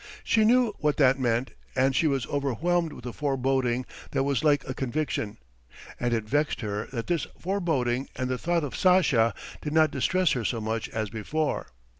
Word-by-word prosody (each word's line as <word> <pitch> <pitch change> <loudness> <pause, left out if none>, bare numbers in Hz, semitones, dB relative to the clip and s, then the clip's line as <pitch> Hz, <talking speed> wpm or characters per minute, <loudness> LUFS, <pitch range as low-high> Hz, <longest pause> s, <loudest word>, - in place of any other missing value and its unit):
She 220 -1 +3
knew 240 -1 +4
what 150 -1 +1
that 135 -2 +4
meant, 120 0 0 0.2
and 130 0 +2
she 160 - +3
was 135 -4 0
overwhelmed 155 +6 0
with 120 - -11
a 120 - -5
foreboding 130 -3 0 0.2
that - - 0
was 140 -1 0
like 145 -2 +3
a 130 - -2
conviction. 130 -5 -2 0.6
And 120 0 0
it 115 -2 +1
vexed 145 +7 0
her 105 -1 -3
that 115 -3 -3
this 170 -5 -1
foreboding 150 -10 -1
and 130 - -2
the 130 -1 -2
thought 170 -1 0
of 145 - -4
Sasha 140 - +4 0.3
did 150 - -4
not 160 -1 +4
distress 185 -3 +2
her 125 - 0
so 115 +2 -1
much 110 +1 -2
as 110 -2 -3
before. 145 +8 -2
135 Hz, 185 wpm, -27 LUFS, 120-155 Hz, 0.6 s, knew